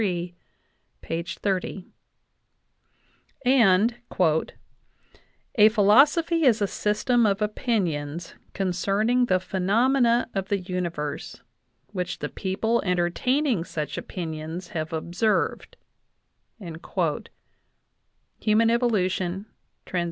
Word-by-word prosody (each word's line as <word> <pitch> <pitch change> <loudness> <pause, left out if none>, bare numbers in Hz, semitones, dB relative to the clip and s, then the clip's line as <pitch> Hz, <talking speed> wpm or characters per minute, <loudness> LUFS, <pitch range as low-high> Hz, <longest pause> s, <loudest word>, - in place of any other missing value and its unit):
xxx); 175 +3 -3 1.6
and 235 -3 +4 1.6
"A 215 -1 +7
philosophy 290 - +4
is 240 -5 +4
a 205 - +2
system 215 +4 +1
of 200 0 +1
opinions 175 - -2 0.2
concerning 200 +6 +1
the 185 -3 +3
phenomena 235 +7 +2
of 195 -1 -2
the 200 - +1
universe, 175 -6 -4 0.5
which 180 -3 -3
the - - -4
people 220 +5 -1
entertaining 185 - +1
such 150 -4 -4
opinions 165 0 -6
have 160 -2 -4
observed" 175 +7 -1 0.8
(Human 190 +5 -3
Evolution, 195 -5 0 0.4
Trans. 180 - -2
195 Hz, 80 wpm, -25 LUFS, 175-230 Hz, 1.6 s, A